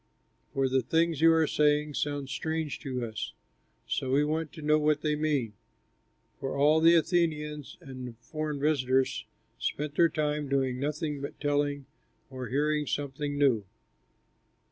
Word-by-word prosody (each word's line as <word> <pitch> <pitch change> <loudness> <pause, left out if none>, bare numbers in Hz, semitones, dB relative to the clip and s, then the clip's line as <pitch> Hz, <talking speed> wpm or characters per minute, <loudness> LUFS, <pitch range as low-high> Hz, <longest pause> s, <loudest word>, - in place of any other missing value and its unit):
For 135 -1 +1
the 130 0 +2
things 160 +4 +1
you 165 0 +7
are 160 -1 +4
saying 150 0 +2
sound 145 -1 -2
strange 160 +1 -2
to 130 -5 -3
us; 110 -1 -5 0.5
so 130 - -2
we 140 +3 +3
want 155 +1 -1
to 155 - -9
know 150 +1 +4
what 150 -1 +2
they 150 -1 +1
mean." 145 -7 0 0.9
(For 135 +1 -3
all 150 +3 +5
the 165 +1 +6
Athenians 155 -4 0
and 130 -2 -8
the 120 - -8
foreign 150 +5 -5
visitors 135 -3 +1 0.3
spent 150 0 -2
their 170 +2 +4
time 150 -2 -1
doing 130 -2 0
nothing 150 0 -2
but 140 - -6
telling 145 -1 0 0.5
or 130 -2 -5
hearing 150 +2 0
something 145 +1 -3
new.) 130 -7 +3
145 Hz, 150 wpm, -29 LUFS, 135-155 Hz, 0.9 s, you